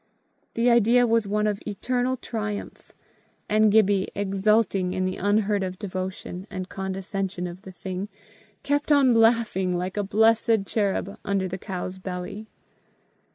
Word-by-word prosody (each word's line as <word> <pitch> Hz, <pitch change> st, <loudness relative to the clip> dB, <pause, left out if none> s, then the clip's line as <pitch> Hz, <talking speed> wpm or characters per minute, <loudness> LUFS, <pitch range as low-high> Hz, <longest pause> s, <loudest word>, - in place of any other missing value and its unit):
The 230 Hz, +1 st, +2 dB
idea 235 Hz, +1 st, +5 dB
was 230 Hz, -2 st, +2 dB
one 210 Hz, +1 st, 0 dB
of 205 Hz, -1 st, 0 dB
eternal 250 Hz, +5 st, -1 dB
triumph; 215 Hz, -4 st, -5 dB, 0.6 s
and 215 Hz, 0 st, +4 dB
Gibbie, 200 Hz, -2 st, +3 dB
exulting 200 Hz, -1 st, +1 dB
in 185 Hz, -, 0 dB
the 185 Hz, 0 st, -2 dB
unheard 205 Hz, 0 st, +1 dB
of 185 Hz, -1 st, -3 dB
devotion 185 Hz, -1 st, -5 dB
and 185 Hz, -2 st, -5 dB
condescension 190 Hz, -1 st, -4 dB
of 175 Hz, +1 st, -7 dB
the 190 Hz, -, -10 dB
thing, 185 Hz, +2 st, -5 dB, 0.5 s
kept 290 Hz, +2 st, 0 dB
on 275 Hz, -4 st, +5 dB
laughing 225 Hz, -6 st, +3 dB
like 185 Hz, +3 st, -4 dB
a 205 Hz, -, +1 dB
blessed 220 Hz, +1 st, +3 dB
cherub 200 Hz, -1 st, -1 dB
under 195 Hz, -1 st, 0 dB
the 185 Hz, +1 st, -5 dB
cow's 185 Hz, -1 st, -5 dB
belly. 185 Hz, +3 st, -6 dB
200 Hz, 140 wpm, -25 LUFS, 190-220 Hz, 0.6 s, idea